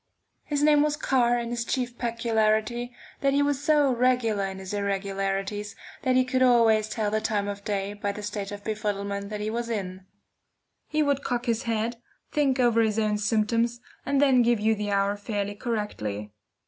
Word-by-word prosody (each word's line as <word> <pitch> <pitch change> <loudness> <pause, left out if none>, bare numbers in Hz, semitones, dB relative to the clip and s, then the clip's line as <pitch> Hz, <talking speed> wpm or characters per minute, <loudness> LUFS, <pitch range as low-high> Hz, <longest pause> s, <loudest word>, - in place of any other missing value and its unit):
His 290 -1 -1
name 295 -1 +5
was 295 0 +1
Carr, 245 -5 +2
and 235 0 -3
his 240 -1 -1
chief 245 0 -2
peculiarity, 230 0 0 0.3
that 275 -1 +2
he 285 +1 +3
was 285 -1 0
so 295 -3 +4
regular 235 -4 +2
in 190 0 -5
his 190 +1 -7
irregularities 200 +1 -2 0.3
that 255 -1 +1
he 255 0 +4
could 255 0 0
always 225 -4 +4
tell 215 -2 -1
the 215 0 0
time 205 -2 -1
of 200 0 -5
day 200 -1 -2
by 205 0 -2
the 210 +1 -8
state 205 0 -4
of 205 0 -7
befuddlement 200 -2 -3
that 210 -1 -4
he 215 +1 -2
was 235 +1 -3
in. 190 -4 -4 0.8
He 305 0 +1
would 285 -1 0
cock 245 -1 -2
his 230 -2 -1
head, 225 +1 -1 0.3
think 275 -3 +1
over 235 -2 +4
his 220 -1 +1
own 210 -1 +1
symptoms, 230 +3 +1 0.2
and 280 0 +1
then 270 -3 +5
give 240 -1 +3
you 220 +1 +3
the 210 -1 -3
hour 200 0 +1
fairly 205 -1 -3
correctly. 205 - -4
220 Hz, 185 wpm, -26 LUFS, 205-245 Hz, 0.8 s, name